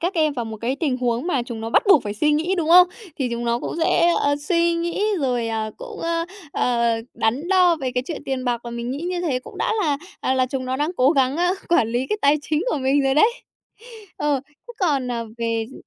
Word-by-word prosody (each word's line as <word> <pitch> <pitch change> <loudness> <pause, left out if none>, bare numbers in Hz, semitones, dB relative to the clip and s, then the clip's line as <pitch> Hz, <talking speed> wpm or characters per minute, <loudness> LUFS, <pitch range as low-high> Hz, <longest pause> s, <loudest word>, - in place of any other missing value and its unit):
các 355 +3 -1
em 310 -3 +2
vào 245 -4 -3
một 220 -1 -6
cái 255 +4 -1
tình 285 -6 0
huống 245 +3 -1
mà 275 -9 0
chúng 235 -2 -7
nó 225 +1 -4
bắt - - +4
buộc 320 - +7
phải 205 -1 -4
suy 300 +8 +2
nghĩ, 330 +6 +1
đúng 330 -3 -1
không? 360 +1 +8 0.3
Thì 260 -2 0
chúng 235 0 -3
nó 235 0 +1
cũng - - -5
sẽ, 340 +1 +3
ờ, 285 0 +2
suy 340 +2 +1
nghĩ 340 +4 -2 0.2
rồi, 245 -4 0
à, 220 -1 -2
cũng, 480 -3 -9
ơ, 335 0 -1 0.3
ờ, 235 -2 +1 0.2
đắn 250 +10 -1
đo 365 -3 +4
về 265 -4 -3
cái 250 - 0
chuyện 325 - -5
tiền 265 -1 -3
bạc, 240 -2 0
mà 235 - -6
mình 235 +1 -4
nghĩ 275 - -3
như 355 0 -2
thế 285 -8 0
cũng - - -12
đã - - 0
là, 290 -4 +1 0.2
ờ, 260 - 0
là 255 -1 +2
chúng 260 0 -4
nó 260 +1 -2
đang 300 +4 0
cố 260 +3 +4
gắng, 270 -1 +2
ơ, 355 +2 +2
quản 285 -10 +3
lý 245 +3 -1
cái 425 - -2
tài 285 +1 +5
chính 310 +3 -1
của - - 0
mình 270 +2 +2
rồi 270 0 +2
đấy. 435 +10 +5 0.9
Ờ, 290 -2 +1
thế 320 +11 -15
còn, 285 -8 +1
ờ, 235 -1 -3
về 230 -1 -1
d - - -12
275 Hz, 255 wpm, -22 LUFS, 245-335 Hz, 0.9 s, không